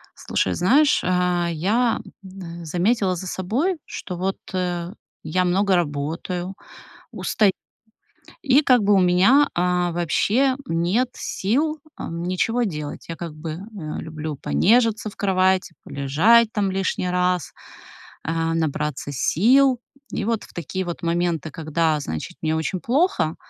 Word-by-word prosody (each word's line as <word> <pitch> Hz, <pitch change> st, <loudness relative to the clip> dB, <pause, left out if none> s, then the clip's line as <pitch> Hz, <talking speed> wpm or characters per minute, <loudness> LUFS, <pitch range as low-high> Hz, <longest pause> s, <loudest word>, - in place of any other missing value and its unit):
Слушай, 95 Hz, -, -1 dB
знаешь, 275 Hz, -, +4 dB
э, -, -, -2 dB, 0.5 s
я, 220 Hz, +9 st, +1 dB, 0.2 s
м, 185 Hz, -3 st, -9 dB
а, -, -, -9 dB
заметила 185 Hz, +4 st, +1 dB
за 185 Hz, +2 st, -6 dB
собой, 245 Hz, -, -1 dB
что 180 Hz, -, -6 dB
вот, 190 Hz, +2 st, -1 dB, 0.2 s
э, 180 Hz, -1 st, -2 dB, 0.3 s
я 180 Hz, +4 st, 0 dB
много 190 Hz, +2 st, +2 dB
работаю, 170 Hz, +4 st, -2 dB, 0.6 s
устаю, 205 Hz, -3 st, +2 dB, 0.9 s
и 275 Hz, +1 st, +4 dB
как 250 Hz, -4 st, +4 dB
бы 205 Hz, +1 st, +4 dB
у 195 Hz, -, +5 dB
меня, 190 Hz, +11 st, +5 dB
а, 180 Hz, 0 st, +1 dB
вообще 210 Hz, -, +1 dB
нет 190 Hz, +7 st, +1 dB
сил, 300 Hz, +10 st, -1 dB, 0.2 s
ам, 170 Hz, +1 st, -5 dB
ничего 205 Hz, +7 st, 0 dB
делать. 150 Hz, -8 st, -5 dB
Я, 165 Hz, -, -4 dB
как 165 Hz, -2 st, -7 dB
бы, 155 Hz, +1 st, -6 dB
э, 185 Hz, -2 st, -7 dB
люблю 155 Hz, -1 st, -5 dB
понежиться 215 Hz, -, +2 dB
в -, -, -15 dB
кровати, 185 Hz, -2 st, +1 dB
полежать 200 Hz, +12 st, +3 dB
там 200 Hz, -2 st, 0 dB
лишний 190 Hz, -1 st, -1 dB
раз, 180 Hz, -2 st, 0 dB, 0.8 s
э, -, -, 0 dB, 0.2 s
набраться 150 Hz, -3 st, -2 dB
сил. 250 Hz, -, +3 dB, 0.3 s
И -, -, -2 dB
вот 230 Hz, -1 st, -1 dB
в -, -, -19 dB
такие 180 Hz, +3 st, -4 dB
вот 175 Hz, 0 st, -6 dB
моменты, 170 Hz, -2 st, -1 dB
когда, 155 Hz, 0 st, 0 dB
значит, 140 Hz, -, -5 dB
мне 160 Hz, 0 st, 0 dB
очень 160 Hz, +4 st, -2 dB
плохо, 240 Hz, -, +1 dB
180 Hz, 140 wpm, -22 LUFS, 165-215 Hz, 0.9 s, у